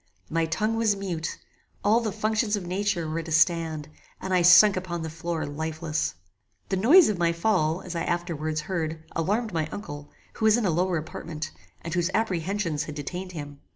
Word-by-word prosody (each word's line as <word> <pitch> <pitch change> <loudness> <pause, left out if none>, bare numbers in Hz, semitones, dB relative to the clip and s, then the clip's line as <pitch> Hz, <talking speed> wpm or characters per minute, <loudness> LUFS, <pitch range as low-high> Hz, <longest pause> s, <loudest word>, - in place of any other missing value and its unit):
My 165 0 +1
tongue 215 +8 0
was 220 -3 +2
mute; 180 -5 -4 0.5
all 215 +3 +4
the 225 -3 -2
functions 215 +1 0
of 195 -3 -4
nature 185 -2 -1
were 155 +1 -2
at 165 - -6
a - - -6
stand, 160 -1 +2 0.3
and 190 - -3
I 180 - +4
sunk 185 +4 +8
upon 175 -2 -3
the 160 - -5
floor 160 0 -3
lifeless. 155 - -3 0.5
The - - +1
noise 295 - +7
of 205 -4 -1
my 170 -1 +3
fall, 170 -2 +1
as 180 -1 -6
I 165 - -1
afterwards 160 -3 -2
heard, 160 -2 -3
alarmed 210 +6 0
my 160 -2 0
uncle, 145 -6 -7 0.2
who 220 - -2
was 220 +1 +6
in 235 - 0
a 185 - +2
lower 180 +2 +1
apartment, 155 0 -6 0.3
and 165 - -4
whose 175 0 +1
apprehensions 185 -6 -1
had 150 - -7
detained 180 +6 -5
him. 145 -3 -7
170 Hz, 190 wpm, -26 LUFS, 160-200 Hz, 0.5 s, sunk